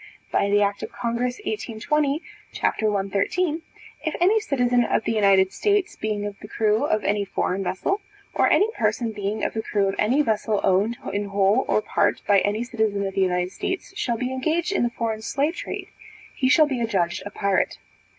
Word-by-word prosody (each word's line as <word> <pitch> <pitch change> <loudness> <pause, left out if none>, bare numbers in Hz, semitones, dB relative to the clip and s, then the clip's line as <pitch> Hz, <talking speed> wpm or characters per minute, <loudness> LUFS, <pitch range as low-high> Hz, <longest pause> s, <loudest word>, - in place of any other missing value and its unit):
By 200 - +2
the 205 0 +4
act 200 0 -1
of - - -6
congress, 240 +1 -2
1820, 300 - -1 0.3
c. - - -8 0.3
113, 210 - 0 0.4
if 315 - -2
any 390 +6 +4
citizen 245 - +2
of 225 - 0
the - - -1
United 195 -3 +4
States, 410 -2 +1
being 210 -1 -2
of 205 -1 -6
the 210 - -10
crew 215 +3 +1
of 215 -7 0
any 205 0 +1
foreign 195 0 -1
vessel, 385 - -1 0.3
or - - +3
any 410 - +4
person 220 +1 0
being 210 0 -3
of - - 0
the 220 - -2
crew 205 -2 0
of 195 - -1
any 255 +8 +3
vessel 215 -3 0
owned 205 +5 +2 0.2
in 205 0 -1
whole 200 +4 +2
or 215 - +2
part 205 - +1
by 200 -1 +5
any 205 +4 0
citizen 220 -5 -1
of 195 - -3
the 195 - 0
United 180 -1 +1
States, 375 - -4
shall 245 - -1
be 250 +2 -2
engaged 320 +8 0
in 395 - +1
the 240 - +2
foreign 225 -2 -3
slave 285 +8 -1
trade, - - -6 0.5
he 260 - +1
shall 310 +2 +6
be 265 -5 -2
adjudged 190 -7 0
a - - -5
pirate. 200 -1 0
220 Hz, 195 wpm, -24 LUFS, 200-265 Hz, 0.5 s, shall